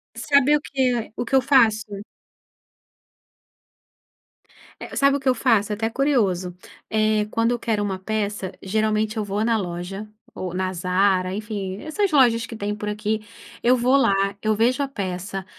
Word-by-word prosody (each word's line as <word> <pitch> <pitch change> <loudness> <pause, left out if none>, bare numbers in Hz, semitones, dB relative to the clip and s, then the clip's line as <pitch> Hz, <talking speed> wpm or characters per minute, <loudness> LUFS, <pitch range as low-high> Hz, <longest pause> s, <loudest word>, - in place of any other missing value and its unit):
Sabe 280 0 +3
o - - -9
que 250 -6 -1
o 240 - -2
que 270 - 0
eu 265 - +6
faço? 215 -6 +2 2.8
É, - - -8
sabe 275 0 +4
o - - -7
que 265 -1 0
eu 255 - +3
faço? 225 -4 +2
É - - 0
até 225 +1 -2
curioso. 195 -11 0 0.3
Eh, 215 -1 +2
quando 230 +2 +1
eu 240 - -1
quero 215 -3 -1
uma 190 -2 -3
peça, 205 -1 -3
geralmente 215 +2 0
eu 215 - -1
vou 205 +2 -2
na 230 -1 +2
loja, 190 +2 -5 0.2
ou 180 -1 -5
na 185 0 -1
Zara, 185 +1 +1
enfim, 205 -3 -4
essas 385 +6 -1
lojas 235 -5 +4
que 230 - -8
tem 210 0 -3
por 210 0 -4
aqui, 210 +1 -2 0.4
eu 250 +1 +4
vou 250 +3 +3
lá, 270 -7 +4 0.3
eu 215 0 +1
vejo 250 +6 +2
a 280 - 0
peça, 190 -4 -5
215 Hz, 170 wpm, -23 LUFS, 195-245 Hz, 2.8 s, eu